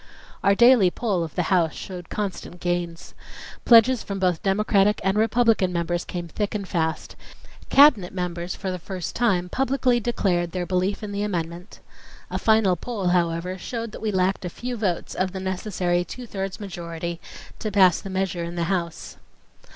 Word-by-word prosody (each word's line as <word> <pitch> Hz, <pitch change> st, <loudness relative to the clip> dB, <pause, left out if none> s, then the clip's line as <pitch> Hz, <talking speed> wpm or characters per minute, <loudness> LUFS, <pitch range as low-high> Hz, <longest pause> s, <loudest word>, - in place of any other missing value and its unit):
Our 200 Hz, -, +4 dB
daily 235 Hz, -4 st, +6 dB
poll 195 Hz, -3 st, -1 dB
of 160 Hz, -, -7 dB
the 180 Hz, -, +1 dB
House 170 Hz, -4 st, +2 dB
showed 180 Hz, -2 st, -8 dB
constant 195 Hz, -3 st, -5 dB
gains. 175 Hz, -1 st, -3 dB, 0.5 s
Pledges 235 Hz, +1 st, +6 dB
from 200 Hz, -, -5 dB
both 180 Hz, -3 st, +1 dB
Democratic 205 Hz, +1 st, +2 dB
and 195 Hz, 0 st, +1 dB
Republican 220 Hz, -3 st, +3 dB
members 175 Hz, 0 st, -1 dB
came 175 Hz, -1 st, -5 dB
thick 205 Hz, +6 st, -3 dB
and 200 Hz, -2 st, -3 dB
fast; 160 Hz, -3 st, -2 dB, 0.5 s
cabinet 265 Hz, -11 st, +6 dB
members 180 Hz, -1 st, -4 dB
for 190 Hz, -, -4 dB
the 185 Hz, -, -4 dB
first 180 Hz, 0 st, -6 dB
time 195 Hz, -7 st, +1 dB
publicly 260 Hz, +1 st, +1 dB
declared 180 Hz, -7 st, 0 dB
their 180 Hz, -1 st, -2 dB
belief 185 Hz, +4 st, -1 dB
in 210 Hz, -, -5 dB
the 200 Hz, 0 st, -3 dB
amendment. 175 Hz, -2 st, -4 dB, 0.5 s
A -, -, -2 dB
final 220 Hz, -4 st, +3 dB
poll, 200 Hz, -1 st, -3 dB
however, 175 Hz, +1 st, 0 dB
showed 230 Hz, +2 st, -5 dB
that -, -, -9 dB
we 220 Hz, -1 st, -1 dB
lacked 190 Hz, 0 st, 0 dB
a 180 Hz, -, -3 dB
few 245 Hz, +7 st, -5 dB
votes 195 Hz, -7 st, -2 dB
of 185 Hz, 0 st, -1 dB
the 190 Hz, -, -4 dB
necessary 185 Hz, -2 st, -1 dB
two 250 Hz, +7 st, -8 dB
thirds 195 Hz, -3 st, -5 dB
majority 170 Hz, -3 st, -6 dB, 0.4 s
to 215 Hz, -, -3 dB
pass 185 Hz, -4 st, +5 dB
the 195 Hz, -, -7 dB
measure 185 Hz, -2 st, -2 dB
in 170 Hz, +1 st, -6 dB
the 170 Hz, -, -1 dB
House. 170 Hz, -3 st, -4 dB
185 Hz, 175 wpm, -24 LUFS, 175-210 Hz, 0.5 s, daily